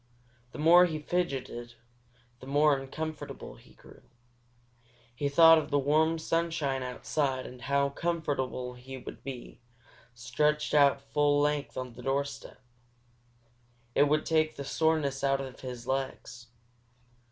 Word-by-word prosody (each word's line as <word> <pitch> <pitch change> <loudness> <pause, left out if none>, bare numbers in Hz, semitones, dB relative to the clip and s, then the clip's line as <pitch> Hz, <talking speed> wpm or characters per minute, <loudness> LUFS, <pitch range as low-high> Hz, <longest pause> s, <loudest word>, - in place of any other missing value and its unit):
The - - -10
more 175 +4 +6
he 160 -2 -3
fidgeted, 135 -7 -3 0.6
the 130 - -12
more 145 +1 +4
uncomfortable 155 +3 -6
he - - -20
grew. - - -17 1.1
He 140 +4 -2
thought 165 +2 +7
of 155 - -6
the 145 - +2
warm 155 +4 +2
sunshine 160 -4 -1
outside 130 +1 -2
and 125 0 -10
how 140 +3 +1
comfortable 140 -6 -2
he 130 +2 -10
would 125 - -10
be, 130 -3 -8 0.6
stretched 150 +5 0
out 140 -2 +4
full 145 0 +3
length 145 0 -1
on 130 -2 -5
the 125 - -11
doorstep. 135 +1 -3 1.3
It 145 - +4
would 155 +1 +1
take 155 -1 +1
the 140 - -6
soreness 150 -3 0
out 135 0 +2
of 135 -2 -7
his 125 -2 -7
legs. 130 -3 -4
140 Hz, 130 wpm, -29 LUFS, 130-155 Hz, 1.3 s, thought